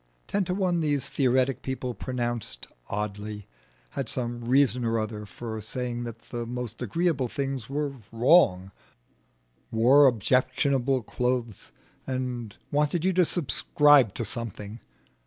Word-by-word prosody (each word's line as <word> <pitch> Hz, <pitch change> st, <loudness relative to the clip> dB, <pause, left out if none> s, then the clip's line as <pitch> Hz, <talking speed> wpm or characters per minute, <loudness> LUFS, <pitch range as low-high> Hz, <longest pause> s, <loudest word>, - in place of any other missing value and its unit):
Ten 200 Hz, -1 st, 0 dB
to 180 Hz, -, -1 dB
one 185 Hz, -3 st, +1 dB
these 145 Hz, -4 st, 0 dB
theoretic 130 Hz, -1 st, +2 dB
people 130 Hz, -1 st, -3 dB
pronounced 120 Hz, -, -3 dB, 0.2 s
oddly, 105 Hz, 0 st, -4 dB, 0.5 s
had 135 Hz, -4 st, -3 dB
some 120 Hz, -1 st, -3 dB
reason 125 Hz, 0 st, +3 dB
or 115 Hz, 0 st, +1 dB
other 110 Hz, -1 st, -4 dB
for 110 Hz, +3 st, -6 dB
saying 120 Hz, +2 st, -3 dB
that 115 Hz, -1 st, -9 dB
the 120 Hz, -1 st, -4 dB
most 120 Hz, -1 st, -5 dB
agreeable 140 Hz, -, 0 dB
things 135 Hz, -2 st, -4 dB
were 145 Hz, 0 st, -2 dB, 0.2 s
wrong, 115 Hz, -, +4 dB, 1.0 s
wore 125 Hz, +5 st, +6 dB
objectionable 130 Hz, +3 st, +1 dB
clothes, 125 Hz, -2 st, -2 dB, 0.4 s
and 125 Hz, -4 st, -4 dB
wanted 150 Hz, +4 st, +1 dB
you 190 Hz, -, +3 dB
to 180 Hz, 0 st, +4 dB
subscribe 145 Hz, -, +4 dB
to 115 Hz, -, -2 dB
something. 110 Hz, -1 st, -5 dB
125 Hz, 125 wpm, -27 LUFS, 115-140 Hz, 1.0 s, wore